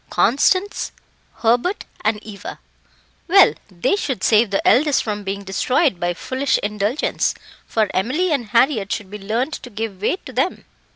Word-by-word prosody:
"Constance, 285 - +2 0.5
Hubert, 245 - +1 0.2
and 215 0 +1
Eva." 205 -2 -8 0.7
"Well, 385 +2 +6 0.2
they 185 - 0
should 275 - -3
save 220 0 +4
the 195 - 0
eldest 290 +2 +4
from 210 -2 -3
being 200 +1 -4
destroyed 200 - +1
by 175 0 -1
foolish 260 +8 0
indulgence, 210 +6 0 0.3
for 220 -2 +1
Emily 295 - 0
and 275 -6 0
Harriett 230 -2 +2
should 205 -3 -4
be 210 - -7
learned 230 +9 -2
to 245 - -7
give 215 -3 -5
way 215 - +1
to 260 - -9
them." 265 +9 -1
225 Hz, 155 wpm, -20 LUFS, 205-275 Hz, 0.7 s, Well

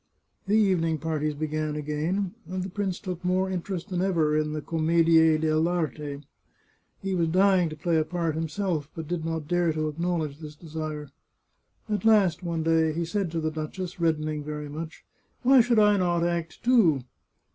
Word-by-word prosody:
The 210 +2 +3
evening 175 -6 +2
parties 155 -1 -2
began 155 0 -2
again, 155 +6 -2
and 185 0 -3
the 190 - -6
prince 195 -2 -2
took 180 -3 -6
more 185 +1 +1
interest 185 +1 -4
than 180 -1 -1
ever 165 -5 +2
in 155 0 0
the 155 0 -3
commedie 165 0 +4
deWarte. 155 -2 -1 0.8
He 195 -1 -1
was 170 -3 +1
dying 185 0 +3
to 155 - -7
play 165 +2 0
a 155 - +3
part 170 -1 -2
himself, 160 -1 -2
but 160 -2 -6
did 175 -1 -2
not 160 -2 -3
dare 175 0 +2
to 155 0 -1
acknowledge 160 -2 -2
this 150 -2 -9
desire. 155 -2 -6 0.8
At 210 -1 -2
last, 200 -7 +4
one 170 -2 -2
day, 160 -1 +2
he 170 +2 -2
said 195 +1 -1
to 165 0 -2
the 155 0 -1
duchess, 170 +4 -5
reddening 155 -2 0
very 150 0 -5
much, 155 +2 -7 0.2
" - - -43
Why 260 0 +7
should 235 0 +2
I 210 -1 +5
not 175 -2 +1
act, 170 -1 -2
too?" 215 - +4
165 Hz, 180 wpm, -26 LUFS, 155-180 Hz, 0.8 s, Why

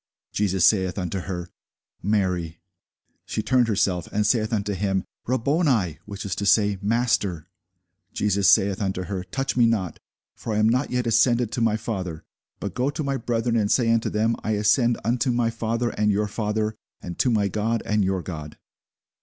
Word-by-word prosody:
Jesus 95 -4 +2
saith 95 -3 +3
unto 95 0 -2
her, 90 -2 -5 0.5
Mary. 90 -5 -1 0.7
She 110 - -2
turned 125 -2 +3
herself, 95 -5 0
and 105 0 0
saith 110 0 +1
unto 105 -2 -1
him, 95 -1 -1 0.2
Rabboni; 130 - +1
which 100 -1 -7
is 95 - -2
to 100 - -2
say, 100 0 +3
Master. 105 -7 0 0.7
Jesus 100 -2 +2
saith 95 0 +3
unto 95 -2 -1
her, 95 0 -4
Touch 135 +7 -3
me 120 -2 +5
not; 100 -7 -1 0.3
for 110 - -5
I - - 0
am 110 0 +4
not 125 +4 +1
yet 125 -1 -1
ascended 115 0 +3
to 120 - -2
my 110 -1 +2
Father: 95 -8 -5 0.4
but 100 -3 -4
go 125 +5 0
to 150 +2 -3
my 140 -1 -1
brethren, 115 -1 -1
and 105 -3 +1
say 115 -3 +3
unto 115 -1 +1
them, 110 +2 +1
I 110 - 0
ascend 115 +3 +2
unto 120 +5 +1
my 120 -1 +1
Father, 115 +1 -1
and 105 0 +1
your 105 +1 0
Father; 105 +1 -2 0.3
and 85 -1 -8
to 130 - +3
my 105 -4 +2
God, 110 +4 -1
and 105 0 +1
your 95 -1 -1
God. 75 -4 -7
105 Hz, 180 wpm, -24 LUFS, 95-115 Hz, 0.7 s, me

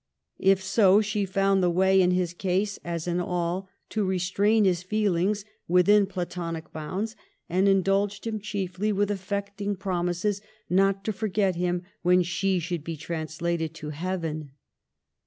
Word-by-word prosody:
If 190 0 +3
so, 195 0 +5
she 210 -1 -1
found 195 0 +2
the 180 - +3
way 190 +2 +4
in 180 - +4
his 180 -1 0
case, 195 +3 -1
as 170 -1 -4
in 175 0 0
all, 180 +1 -2 0.2
to 215 - -1
restrain 195 +3 +2
his 180 -3 +2
feelings 200 0 0 0.2
within 195 +3 +5
platonic 175 -3 -5
bounds, 190 +9 -4 0.3
and 185 +3 +2
indulged 195 +1 +2
him 220 -1 -2
chiefly 200 0 -2
with 205 0 +1
affecting 200 +1 -3
promises 185 +1 -1 0.3
not 195 +1 +2
to 215 - -1
forget 200 -2 0
him 175 0 -1 0.2
when 180 +1 +4
she 185 +2 0
should 170 -2 -3
be 165 -1 -5
translated 160 +1 -3
to 150 -2 -6
heaven. 155 -3 -4
185 Hz, 145 wpm, -26 LUFS, 175-200 Hz, 0.3 s, so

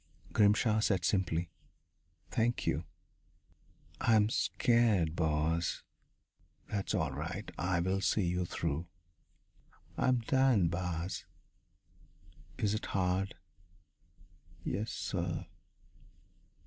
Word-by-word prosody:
Grimshaw 105 +1 +4
said 95 -6 +1
simply: 85 -2 0 0.8
"Thank 120 0 +1
you." - - 0 1.1
"I'm 110 -2 +4
scared, 110 -13 +2
boss." 80 +1 0 0.8
"That's 100 +1 -2
all 80 -7 0
right. 85 +9 -5
I'll 95 +1 +1
see 105 - +2
you 90 +1 0
through." 80 0 -2 1.1
"I'm 125 -2 +3
dyin', 125 -7 +3
boss." 85 0 -3 1.3
"Is 105 -1 +1
it 110 - -3
hard?" 95 0 0 1.3
"Yessir." 90 -5 -2
95 Hz, 80 wpm, -33 LUFS, 85-110 Hz, 1.3 s, Grimshaw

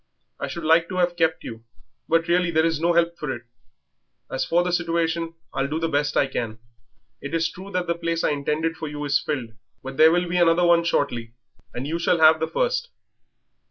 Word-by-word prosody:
I - - -3
should 170 - -6
like 165 +2 +3
to 185 - -5
have 175 -1 +1
kept 160 -1 0
you, 115 -1 -8 0.5
but 165 +1 +2
really 175 0 +2
there 160 -1 +2
is 165 -2 0
no 170 +2 +2
help 170 0 +1
for 150 -3 -3
it. 120 -2 -6 0.9
As 130 0 -1
for 170 +6 +2
the 180 - -1
situation, 165 -1 -1 0.2
I'll 135 0 -1
do 155 +3 -2
the 165 - 0
best 145 -1 0
I - - +4
can. 115 -4 -4 0.6
It 140 +3 -4
is 165 0 +1
true 190 +2 -10
that 175 -2 -2
place 165 0 -1
I - - +2
intended 150 +3 -1
for 160 - -5
you 150 0 -5
is 145 0 +2
filled 130 -7 -4
up, - - -28 0.3
but 135 0 -7
there 160 +1 +7
will 175 +1 +1
be 180 +1 -1
another 170 0 +4
shortly, 120 -8 -1 0.4
and 125 +2 -5
you 165 +3 -2
shall 170 +1 +2
have 160 0 +6
the 160 - -1
first. - - -1
165 Hz, 215 wpm, -23 LUFS, 145-170 Hz, 0.9 s, there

